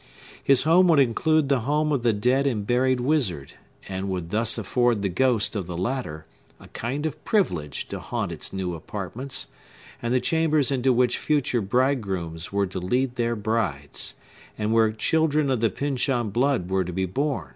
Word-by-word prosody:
His 135 -2 +4
home 175 +4 +5
would 165 -3 +5
include 140 +4 +3
the 140 -2 +2
home 150 +5 0
of 140 -4 +1
the 120 -1 +3
dead 125 +6 +1
and 110 -6 -1
buried 125 +2 +2
wizard, 120 - -1 0.3
and 95 0 -4
would 90 -3 -4
thus 110 +2 +1
afford 115 0 +1
the 100 - +1
ghost 115 +3 +1
of 95 -4 -3
the 90 -2 -5
latter 90 - -3 0.3
a - - -15
kind 135 +6 -4
of 155 - -4
privilege 85 - -1
to - - -5
haunt - - -3
its - - -4
new 95 -2 -3
apartments, 105 - -5 0.6
and 120 - -2
the 130 - +3
chambers 155 0 +1
into 130 -1 +2
which 125 0 +2
future 140 -5 +1
bridegrooms 95 -8 -1
were 100 0 +1
to 95 0 -5
lead 125 +7 0
their 120 -1 0
brides, 100 -10 -1 0.4
and 105 +1 -1
where 110 -1 +4
children 150 +4 +1
of 130 - +1
the 115 0 +2
Pyncheon 125 -2 -1
blood 125 -4 +1
were 95 0 +1
to 90 - -5
be 95 +2 -1
born. 140 - -2
120 Hz, 180 wpm, -25 LUFS, 95-135 Hz, 0.6 s, home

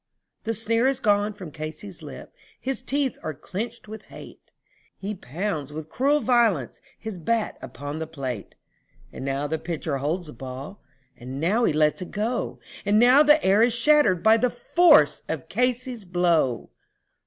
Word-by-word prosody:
The 225 0 -1
sneer 230 +3 +1
is 270 -1 +1
gone 210 -3 +2
from 185 -6 -9
Casey's 155 +5 -8
lip; - - -10 0.3
his 265 -1 -3
teeth 270 0 -1
are 155 - -4
clenched 215 - -6
with 220 +1 -9
hate, - - -13 0.5
He 200 +2 -4
pounds 160 -3 -4
with 155 +1 -7
cruel 285 - +2
violence 225 - +2 0.2
his 220 -4 -7
bat 225 +6 -1
upon 145 +2 -6
the 160 - -4
plate; 130 -9 -6 0.6
And - - -7
now 135 +1 -2
the 160 +2 -2
pitcher 160 -3 -3
holds 165 +6 -2
the 150 - -10
ball, 135 +9 -8 0.3
and 130 +2 -7
now 205 +10 +2
he - - +3
lets 150 +3 +2
it 180 - -6
go, 230 +4 -2 0.2
And 205 +1 +2
now 250 +5 +7
the 300 0 +5
air 195 +3 +5
is 235 0 +4
shattered 235 - +4
by 220 +1 +6
the 250 +2 +2
force 335 +3 +4
of - - -4
Casey's 250 -2 -1
blow. 170 - +1
205 Hz, 165 wpm, -25 LUFS, 155-235 Hz, 0.6 s, now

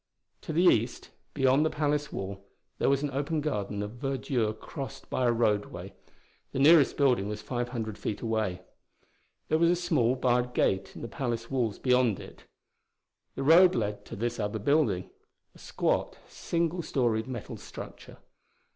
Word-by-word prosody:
To - - -6
the 165 +3 +2
east, 120 -9 +2 0.2
beyond 135 +1 +4
the 160 - +2
palace 150 -1 -1
wall, 95 0 -5 0.4
there - - +2
was 140 +1 +2
an 145 - -1
open 145 +4 -1
garden 105 -8 -2
of 115 +4 -8
verdure 130 -5 0
crossed 135 +5 -8
by 125 - +1
a - - +4
roadway. 105 -3 -1 0.6
The - - -3
nearest 145 0 +6
building 125 -8 +2
was 105 0 -5
five 120 -1 -3
hundred 110 -4 -4
feet 105 - -3
away. 110 -6 -2 0.9
There 155 - +2
was 170 0 +4
a 175 - +4
small, 155 -9 +1
barred 125 -1 +1
gate 95 0 +1
in - - -8
the - - -3
palace 120 0 -4
walls 120 -6 0
beyond 125 -5 +2
it. - - -12 0.9
The 135 - -3
road 175 +5 +7
led 105 -3 -2
to - - -8
this 120 +3 -3
other 105 +1 -1
building 110 - +1 0.4
a - - -18
squat, - - -1
single 170 +1 -2
storied 120 -8 0
metal 120 -4 -6
structure. - - -10
125 Hz, 165 wpm, -29 LUFS, 110-145 Hz, 0.9 s, road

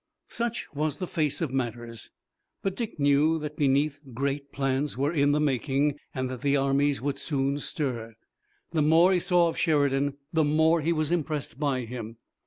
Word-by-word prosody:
Such 235 -1 -2
was 150 0 -1
the 185 - -3
face 155 -4 -1
of 150 -6 -2
matters, 120 -3 -4 0.5
but 195 -1 -1
Dick 225 -8 -5
knew 145 +3 +3
that, 150 -1 -5
beneath, 145 +1 +1 0.2
great 140 +2 -2
plans 135 0 -1
were 140 +4 0
in 145 -2 +3
the 150 - +2
making 145 0 +1 0.2
and 130 -1 -1
that 125 -2 -6
the 140 0 +2
armies 140 0 +1
would 140 -1 -2
soon 140 -1 -1
stir. 120 -7 -3 0.6
The 160 -2 +1
more 165 +5 +5
he 180 - +3
saw 175 -1 +3
of 165 - -5
Sheridan 145 -4 +2 0.2
the 160 -1 +3
more 160 +2 +3
he 165 +3 +1
was 155 -1 0
impressed 155 -5 -2
by 140 -4 0
him. 115 -1 -7
145 Hz, 180 wpm, -27 LUFS, 135-155 Hz, 0.6 s, more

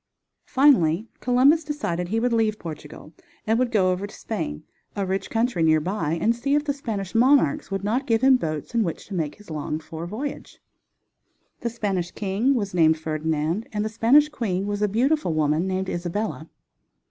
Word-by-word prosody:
Finally 220 - +4
Columbus 265 +6 +4
decided 180 - -3
he 220 +5 0
would 245 +1 +1
leave 220 -2 +1
Portugal 155 -2 -9 0.3
and 225 +2 +2
would 255 -1 +1
go 190 -5 +3
over 185 +2 -2
to 205 - -13
Spain, 75 - -4 0.3
a 200 - -1
rich 190 +1 -2
country 225 -5 0
near 160 -1 +4
by, 165 -2 -2
and 230 +1 +2
see 275 +4 0
if 295 - +2
the 285 - 0
Spanish 215 -9 -5
monarchs 275 +5 +3
would 195 0 -3
not 240 +7 -1
give 225 -1 +2
him 265 0 +7
boats 155 - -3
in 235 - +2
which 170 -5 -4
to 205 - -9
make 155 -5 -2
his 210 -5 -14
longed 155 +1 -4
for 165 +2 -7
voyage. 260 +10 -6 1.0
The 235 - -2
Spanish 200 -6 -2
king 210 +9 0
was 200 -6 -2
named 160 -2 +4
Ferdinand, 155 +4 -2
and 210 0 -2
the - - -1
Spanish 235 +7 +4
queen 200 -10 -2
was 205 0 -3
a 210 - +3
beautiful 245 - +1
woman 155 +3 +1
named 190 0 -2
Isabella. 175 -1 -3
205 Hz, 185 wpm, -24 LUFS, 170-235 Hz, 1.0 s, him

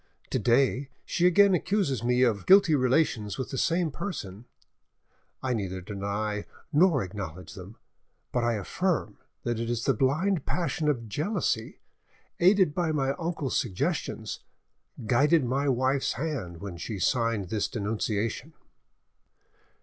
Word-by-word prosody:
To - - +1
day 130 +2 +2 0.2
she 175 - +2
again 195 +2 +5
accuses 170 - 0
me 125 +1 +3
of, 110 -6 +1
guilty 190 -4 +7
relations 130 -6 +1
with 130 - -4
the 135 - -3
same 170 -1 +1
person; 115 - -6 1.0
I 130 -1 0
neither 95 -4 -3
deny 105 +2 -3 0.3
nor 160 -3 +4
acknowledge 95 -2 -7
them, 95 +4 -11 0.5
but 125 - 0
I 120 0 +2
affirm 115 - -2 0.2
that 120 -2 -1
it 115 0 -2
is 120 -1 -1
the 135 - +3
blind 150 - +1
passion 155 -3 -1
of 120 -6 -1
jealousy 145 - -2 0.6
which, 175 - +4
aided 190 -6 +3
by 170 -2 0
my 135 -3 +1
uncle's 165 -5 -1
suggestions, 105 -9 -2 0.7
guided 145 +6 +3
my 135 +3 0
wife's 130 +2 +1
hand 115 - -4
when 95 -4 -6
she 105 +4 -5
signed 115 -2 0
this 105 -1 0
denunciation." 110 +5 -2
125 Hz, 135 wpm, -28 LUFS, 105-155 Hz, 1.0 s, guilty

